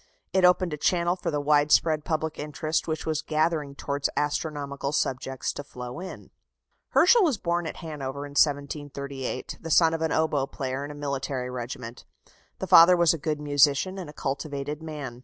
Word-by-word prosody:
It 190 - +3
opened 180 -2 +4
a - - -3
channel 175 +3 +1
for 180 - -4
the 150 -2 -1
widespread 150 +1 +3
public 160 -1 -2
interest 155 +1 -2
which 160 -1 -3
was 155 -2 -1
gathering 155 -2 -1
towards 140 0 -2
astronomical 145 -2 -2
subjects 135 -1 -2
to 145 - -6
flow 125 0 -8
in." 185 +1 -9 0.6
Herschel 480 -1 +5
was 310 - +2
born 170 -2 -1
at - - -5
Hanover 140 -2 -5
in 145 - -10
1738, 140 -2 -2
the 165 - -6
son 165 0 +5
of 165 - -2
an 160 -1 0
oboe 150 -4 +1
player 135 -1 -4
in 145 - -6
a 150 - -8
military 135 -3 -3
regiment. 120 -1 -7 0.5
The - - -4
father 175 +2 +8
was 170 -1 +4
a 165 - -4
good 150 0 -2
musician, 145 +5 +2
and 175 -5 -7
a - - -10
cultivated 145 +1 -4
man. 145 -6 -7
150 Hz, 175 wpm, -26 LUFS, 140-160 Hz, 0.6 s, father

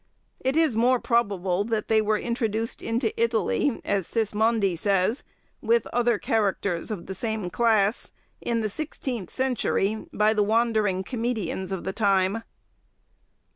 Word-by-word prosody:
It 265 +2 -1
is 315 -8 +3
more 245 +3 +3
probable 200 -6 +1
that 220 -2 -2
they 220 -1 +4
were 215 0 +1
introduced 230 -1 -2
into 230 0 -1
Italy, 230 +3 +1
as 195 -4 0
Sismondi 220 -3 +1
says, 195 - +1 0.4
with 230 0 +2
other 240 -2 +2
characters 200 -5 0
of 210 -6 -5
the 190 - -5
same 215 -2 -3
class, 220 -1 +2 0.3
in 230 -1 -1
the 215 - 0
sixteenth 245 - -4
century, 230 -5 -1
by 215 +1 +3
the 215 - +1
wandering 215 -3 +1
comedians 225 -6 -3
of 190 -2 -3
the 190 - -3
time. 200 0 +2
220 Hz, 135 wpm, -25 LUFS, 200-235 Hz, 0.4 s, they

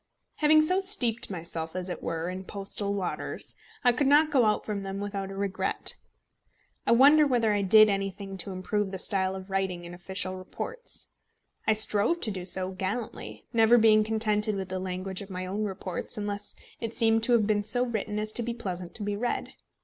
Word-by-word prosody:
Having 310 0 +5
so 365 +5 +3
steeped 250 - +3
myself, 165 -3 -5
as 185 0 -2
it 180 - -5
were, 165 0 -3
in 185 +1 -5
postal 200 +1 -4
waters, 190 -3 -4 0.3
I 245 - +6
could 265 +3 +1
not 300 +2 +5
go 260 -5 +4
out 215 - +1
from 205 -2 -3
them 195 0 -5
without 200 -1 -4
a 195 - -7
regret. 195 -1 -2 0.9
I - - +4
wonder 290 +5 +7
whether 235 -5 +2
I 205 - +1
did 215 +3 +7
anything 195 -1 -3
to 190 +2 -2
improve 195 +2 -2
the 190 - -5
style 190 0 0
of 190 +1 -9
writing 190 -2 -1
in 170 - -9
official 185 +1 -4
reports! 470 - -7 0.6
I 220 - +5
strove 215 +8 +2
to 220 - -1
do 185 -2 -5
so 185 0 +1
gallantly, 195 +5 -5
never 230 +1 +6
being 215 -1 +5
contented 215 -1 +1
with 190 -1 -4
the 185 0 -3
language 185 +1 -4
of 200 - -9
my 185 -1 -5
own 205 +3 -2
reports 185 -2 -5
unless 205 0 -3 0.2
it 230 -1 -5
seemed 225 -1 +3
to 245 - +2
have 225 -3 +4
been 210 -1 +1
so 245 +4 +2
written 215 -3 -3
as 215 0 -2
to 240 - -3
be 235 0 -3
pleasant 180 -6 -6
to 215 - -6
be 205 0 -2
read. 240 +4 -2
205 Hz, 200 wpm, -28 LUFS, 190-225 Hz, 0.9 s, wonder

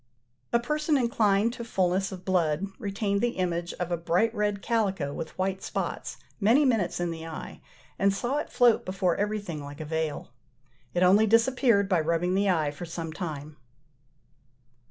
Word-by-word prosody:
A 235 - +4
person 300 +4 0
inclined 225 -3 +2
to 235 - -6
fulness 190 -3 0
of 185 -1 -9
blood 175 -2 +1
retained 200 0 -1
the 240 0 0
image 175 -1 -1
of 180 -1 -4
a 175 - +1
bright 180 +7 +1
red 205 -2 -1
calico, 195 -11 0
with 160 - -6
white 190 0 -1
spots, - - -4 0.2
many 235 +8 +4
minutes 225 -11 +1
in 175 -1 -1
the 165 0 -7
eye, 160 - -8 0.4
and 200 +1 +4
saw 240 +8 -1
it 300 - -3
float 240 -3 +4
before 185 -2 0
everything 205 -7 -2
like 145 +1 -9
a 155 - -5
veil. 160 -4 -3 0.6
It 175 - +3
only 200 +4 +5
disappeared 230 -2 +3
by 185 -3 +2
rubbing 170 +3 0
the 200 +1 +2
eye 155 -5 +1
for 145 +4 -9
some 165 -1 -5
time. 155 -4 -6
190 Hz, 170 wpm, -27 LUFS, 170-220 Hz, 0.6 s, only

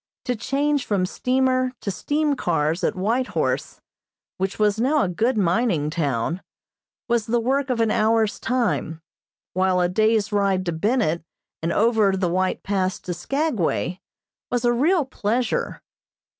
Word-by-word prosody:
To 250 - 0
change 275 +5 0
from 195 -3 0
steamer 255 +4 +1
to 200 - -2
steam 290 - 0
cars 160 - 0
at - - +1
White 230 +7 0
Horse, - - -1 0.6
which 190 +1 -2
was 210 0 +2
now 280 +5 +3
a - - 0
good 225 +7 0
mining 180 -5 +1
town, 150 +2 -1 0.7
was 235 -2 +1
the 235 +1 +2
work 265 +4 0
of 250 -2 0
an 225 -1 +2
hour's 220 0 +2
time, 210 -10 -1 0.5
while 185 0 +2
a 180 - +3
day's 215 +2 +2
ride 195 -2 +1
to 170 - 0
Bennett 170 -2 0 0.4
and 165 +1 -1
over 215 -2 +3
the 185 -2 0
White 185 +1 0
Pass 190 -2 -1
to 180 - -4
Skagway 190 - -1 0.5
was 245 0 0
a 240 - +4
real 310 +6 +2
pleasure. 235 -1 -2
215 Hz, 150 wpm, -23 LUFS, 185-250 Hz, 0.7 s, a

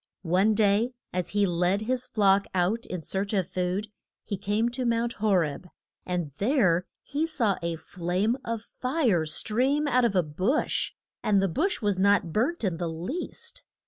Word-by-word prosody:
One 190 +5 +3
day 215 +3 +3 0.2
as 180 -1 -1
he 205 0 +2
led 180 +2 +1
his 250 +3 -1
flock 200 -3 +3
out 190 +6 +1
in 180 -3 -5
search 195 +5 -2
of 190 -4 +1
food 185 +3 -2 0.3
he 205 - -3
came 205 +4 0
to 250 +2 -3
Mount 235 0 +1
Ho 215 -3 +3
reb, 165 0 0 0.4
and 175 -5 -2
there 195 - +2 0.2
he 295 +4 -1
saw 230 - 0
a 170 0 -2
flame 180 +7 -1
of 230 -1 -3
fire 250 - 0
stream 260 - +1
out 255 -2 +3
of 230 -4 +2
a 180 - +4
bush, 185 - 0 0.3
and 205 -2 +3
the 195 - +2
bush 320 - -1
was 205 -3 +1
not 200 -4 +3
burnt 260 +8 0
in 185 -5 0
the 170 -1 -2
least. 280 - -4
205 Hz, 175 wpm, -27 LUFS, 180-235 Hz, 0.4 s, a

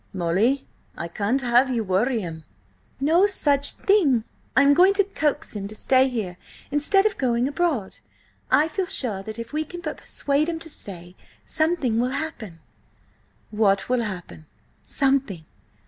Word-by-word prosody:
"Molly, 195 +10 +1 0.3
I 170 - -4
can't 210 +9 -1
have 245 +1 +3
ye 245 -2 0
worry 220 +4 0
him—" 160 -3 -7 0.6
"No 330 +8 +4
such 285 -7 +2
thing! 305 - +2 0.3
I 270 - +7
am 280 0 +6
going 370 +6 +5
to 400 - +4
coax 310 -7 -2
him 200 -1 -4
to 215 - -10
stay 260 +3 +3
here 205 -8 -4 0.3
instead 315 +8 +3
of 430 - 0
going 245 -1 +1
abroad. 285 - -1 0.5
I 305 - +4
feel 365 +3 -3
sure 245 - 0
that 215 +2 -8
if 230 +3 -8
we 310 +1 0
can 350 +3 -9
but - - -5
persuade 285 +3 -1
him 330 - -2
to 320 -1 -6
stay, 175 -6 -6 0.3
something 315 -8 0
will 245 +1 +1
happen." 220 - -6 0.9
"What 200 -2 +1
will 250 -1 +2
happen?" 180 -7 -7 0.4
"Something!" 270 - 0
255 Hz, 160 wpm, -23 LUFS, 205-310 Hz, 0.9 s, I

